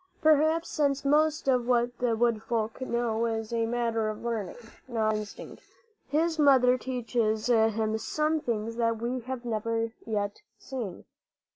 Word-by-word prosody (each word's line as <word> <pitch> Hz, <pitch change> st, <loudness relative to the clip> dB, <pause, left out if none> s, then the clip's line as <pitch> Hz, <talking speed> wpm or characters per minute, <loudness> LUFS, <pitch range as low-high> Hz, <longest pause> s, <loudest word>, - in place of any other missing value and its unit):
Perhaps 315 Hz, +1 st, +3 dB
since 280 Hz, -2 st, 0 dB
most 305 Hz, +1 st, +2 dB
of 250 Hz, -3 st, +2 dB
what 240 Hz, -1 st, +1 dB
the 245 Hz, -2 st, +1 dB
wood 230 Hz, -1 st, +1 dB
folk 225 Hz, +1 st, -2 dB
know 235 Hz, -2 st, 0 dB
is 225 Hz, 0 st, -3 dB
a 230 Hz, -1 st, +1 dB
matter 230 Hz, -2 st, 0 dB
of 215 Hz, -, -6 dB
learning, 225 Hz, -5 st, -3 dB, 0.3 s
not 220 Hz, -3 st, +1 dB
of 215 Hz, -, -1 dB
instinct 210 Hz, -1 st, -9 dB, 0.5 s
his 320 Hz, +3 st, 0 dB
mother 260 Hz, -4 st, +6 dB
teaches 235 Hz, -4 st, -1 dB
him 220 Hz, -2 st, +2 dB
some 305 Hz, +6 st, 0 dB
things 230 Hz, -3 st, -3 dB
that 230 Hz, -1 st, +1 dB
we 245 Hz, +2 st, -2 dB
have 250 Hz, 0 st, -6 dB
never 230 Hz, 0 st, -1 dB
yet 205 Hz, -2 st, -3 dB, 0.2 s
seen. 235 Hz, -9 st, -6 dB
235 Hz, 150 wpm, -28 LUFS, 225-260 Hz, 0.5 s, mother